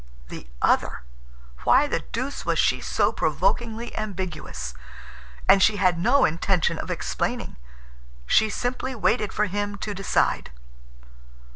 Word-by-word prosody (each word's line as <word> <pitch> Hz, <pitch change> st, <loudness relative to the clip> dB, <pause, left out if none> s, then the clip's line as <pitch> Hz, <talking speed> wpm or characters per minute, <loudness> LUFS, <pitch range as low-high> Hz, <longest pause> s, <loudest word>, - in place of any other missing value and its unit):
The 65 Hz, -, -9 dB, 0.2 s
other! -, -, +2 dB, 0.6 s
Why 280 Hz, -, +5 dB
the 290 Hz, -, -1 dB
deuce 255 Hz, +5 st, -5 dB
was -, -, 0 dB
she -, -, +2 dB
so -, -, +1 dB
provokingly 235 Hz, -, -1 dB
ambiguous? 180 Hz, -, -5 dB, 0.7 s
And 195 Hz, -, +6 dB
she 215 Hz, -, +5 dB
had 185 Hz, -3 st, +2 dB
no 245 Hz, +10 st, +4 dB
intention 170 Hz, +2 st, +1 dB
of -, -, -5 dB
explaining. -, -, -3 dB, 0.7 s
She 220 Hz, -, +4 dB
simply 250 Hz, +4 st, -3 dB
waited 215 Hz, -2 st, +1 dB
for 210 Hz, -, +1 dB
him 205 Hz, +1 st, -3 dB
to 205 Hz, +1 st, -4 dB
decide. 195 Hz, 0 st, 0 dB
205 Hz, 125 wpm, -24 LUFS, 185-240 Hz, 0.7 s, And